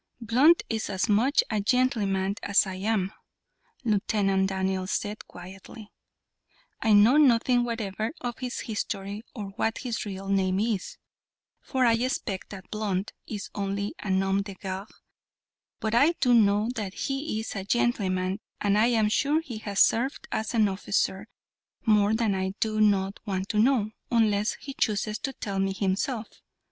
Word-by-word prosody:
"Blunt 255 +9 +4
is 220 -1 -2
as 190 +2 -1
much 230 +7 +3
a 215 -2 +1
gentleman 200 -5 +1
as 200 0 +3
I 190 - -5
am," 195 0 -1 0.7
Lieutenant 195 -3 +1
Daniels 190 -1 -1
said, 210 +1 -3
quietly. 190 +4 -11 0.9
"I 220 - +3
know 215 +7 +6
nothing 245 -3 +4
whatever 220 -2 -3
of 240 -2 -5
his 250 -1 -4
history 205 -1 -4
or 205 -4 -5
what 225 - 0
his 245 -4 -3
real 195 -1 -6
name 190 -1 +1
is, 215 -3 -2 0.6
for 260 -2 0
I 230 - +5
expect 230 -4 -2
that 190 -2 -10
Blunt 205 -2 -2
is 205 -2 -6
only 200 0 -2
a 205 - -6
nom 195 +1 +2
de 200 -1 -7
guerre, 190 +1 -5 0.9
but 220 0 -2
I 285 +8 +5
do 250 -7 +2
know 210 0 +4
that 205 -5 -5
he 270 -4 -2
is 220 - -5
a 195 - -3
gentleman, 195 -4 0 0.2
and 205 0 +2
I 225 - +5
am 225 -3 +3
sure 285 +8 +2
he 240 -9 -7
has 205 -2 -3
served 255 +5 +2
as 220 +2 -2
an 215 -2 +4
officer. 195 +1 -1 0.6
More 210 -1 +4
than 225 -2 +1
that 190 - -1
I 190 0 -2
do 215 -1 0
not 200 -2 +2
want 190 0 -2
to 210 - +1
know, 225 -3 +3 0.2
unless 215 -3 +2
he 275 - -8
chooses 215 -3 -1
to 270 - -4
tell 200 -5 -4
me 195 0 +1
himself. 210 +4 -1
210 Hz, 160 wpm, -27 LUFS, 195-230 Hz, 0.9 s, know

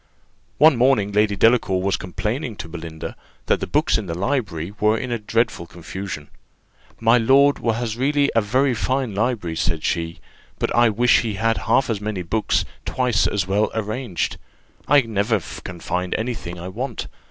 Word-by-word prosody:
One 150 -2 +6
morning 120 -5 +3
Lady 105 0 +2
Delacour 105 -3 +3
was 95 +1 +1
complaining 110 - -3
to 90 - -7
Belinda, 80 -1 -7 0.3
that - - +2
the - - -4
books 155 -3 +2
in 105 - -6
the 85 0 -4
library 100 - -2
were 105 +1 +3
in 125 +2 -4 0.2
dreadful 115 -7 0
confusion. 85 -2 -7 0.7
"My 115 +2 +4
lord 140 +5 +4
has 115 0 -1
really 140 +2 +2
a 115 - +5
very 130 +6 +2
fine 130 0 -1
library," 105 -6 -1
said 80 -1 -1
she; 85 0 -2 0.4
"but - - -1
I 120 -1 +5
wish 120 +3 +4
he 110 -3 -3
had 115 +2 +1
half 135 - +4
as 110 -3 -2
many 105 -3 -3
books 105 +6 0 0.2
twice 125 -2 +1
as 100 -3 0
well 100 +3 +1
arranged: 110 -2 -2 0.5
I 145 -1 +6
never 110 -2 0 0.2
can 90 -1 -7
find 90 +2 -2
any 120 +3 -1
thing 90 -6 -7
I 90 - -6
want. 120 +6 -4
110 Hz, 170 wpm, -22 LUFS, 95-125 Hz, 0.7 s, One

